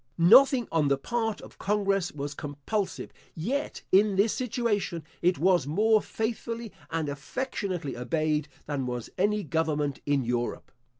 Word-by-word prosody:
Nothing 245 - +6
on 160 -3 +2
the 140 -1 +3
part 225 - -2
of - - -14
congress 195 -3 +1
was 145 0 -5
compulsive; 145 +9 -4 0.2
yet, 260 - -3
in 200 +1 +5
this 205 +3 +3
situation, 230 -8 -1 0.2
it 180 +1 +3
was 175 -5 +3
more 215 +7 +3
faithfully 230 0 -4 0.2
and 160 -2 -1
affectionately 175 - -3
obeyed 150 +4 0 0.2
than 140 -3 -2
was 125 -2 -4
any 210 +2 +2
government 150 -2 -1
in 145 -2 +2
Europe. 120 0 -2
175 Hz, 135 wpm, -28 LUFS, 145-215 Hz, 0.2 s, Nothing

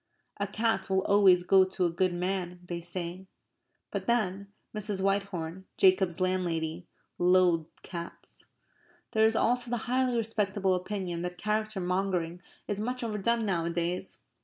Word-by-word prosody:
A 200 - -1
cat 215 -1 0
will 190 0 +2
always 195 -3 +5
go 190 +1 +6
to 185 0 -1
a 170 - +1
good 185 +2 +1
man, 180 0 -2
they 175 -1 -4
say; 175 +2 -5 0.6
but - - -4
then, 200 -4 0 0.2
Mrs. 210 -2 -1
Whitehorn, 190 -3 -1
Jacob's 185 -2 +4
landlady, 175 -2 -1 0.3
loathed 175 -3 +3
cats. 170 -2 -8 0.6
There 220 0 +5
is 225 - 0
also 245 +1 +2
the 240 -2 -2
highly 250 0 +1
respectable 205 -4 +1
opinion 180 -2 -3
that 180 0 -4
character 215 0 -1
mongering 180 -2 -1 0.3
is 205 -1 -2
much 250 +3 -2
overdone 225 +1 0
nowadays. 170 -1 -1
190 Hz, 135 wpm, -29 LUFS, 175-210 Hz, 0.6 s, go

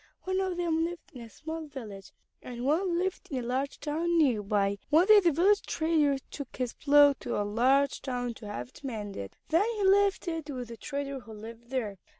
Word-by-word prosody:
One 375 0 -1
of 375 -2 -2
them 330 -2 +1
lived 345 0 -5
in 250 - -9
a 230 - -10
small 315 +6 -7
village, 215 -9 -9 0.3
and 245 0 -6
one 340 +5 +1
lived 375 +1 -2
in 270 - -3
a - - -1
large 265 +3 -2
town 330 +3 0
near 260 -9 +3
by. 200 -1 0
One 320 +5 +5
day 430 0 +8
the 350 -4 +3
village 385 +7 +3
trader 315 -4 +1
took 280 -4 -7
his 250 -2 -2
plow 290 -1 +6
to - - -8
the 205 - 0
large 260 +6 +2
town 245 -2 -3
to 215 - -10
have 125 -12 -5
it - - -17
mended. 205 - -6
Then 350 +7 +3
he 415 - -2
left 395 0 +3
it 325 -3 -3
with 250 -4 -5
the 230 - -8
trader 280 +2 -4
who 225 -3 -12
lived 230 +2 -11
there. 225 -7 -3
280 Hz, 210 wpm, -29 LUFS, 235-330 Hz, 0.3 s, day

